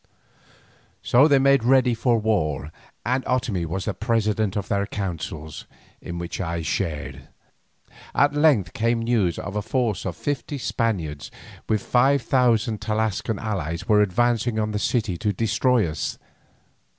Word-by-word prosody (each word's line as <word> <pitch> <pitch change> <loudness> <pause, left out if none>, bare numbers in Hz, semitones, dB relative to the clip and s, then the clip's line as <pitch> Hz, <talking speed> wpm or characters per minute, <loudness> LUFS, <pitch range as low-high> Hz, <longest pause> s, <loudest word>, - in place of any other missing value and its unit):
So 130 +5 +5
they 145 -3 +5
made 140 -2 +4
ready 130 0 +4
for 115 +1 +2
war, 80 -10 -1 0.3
and 130 +2 0
Otomie 110 -9 -1
was 95 +4 -3
the 105 - -1
president 110 -3 0
of 100 - -3
their 100 0 0
councils, 80 -6 -5 0.3
in 85 - -6
which 85 +2 -5
I 85 -2 -3
shared. 75 -6 -3 0.9
At 145 0 +3
length 145 - +3
came 115 0 0
news 110 -8 +1
that - - -6
a 105 +1 -3
force 110 -3 -1
of - - -3
fifty 145 0 -3
Spaniards 90 - -2 0.4
with 110 -2 +1
five 135 +1 +3
thousand 115 -3 +2
Tlascalan 110 0 -1
allies 85 -7 -3
were 105 -1 +5
advancing 115 +3 +1
on 110 0 0
the 105 - -2
city 110 -6 0
to 105 -2 0
destroy 115 +2 +2
us. 75 0 -4
110 Hz, 145 wpm, -23 LUFS, 90-120 Hz, 0.9 s, So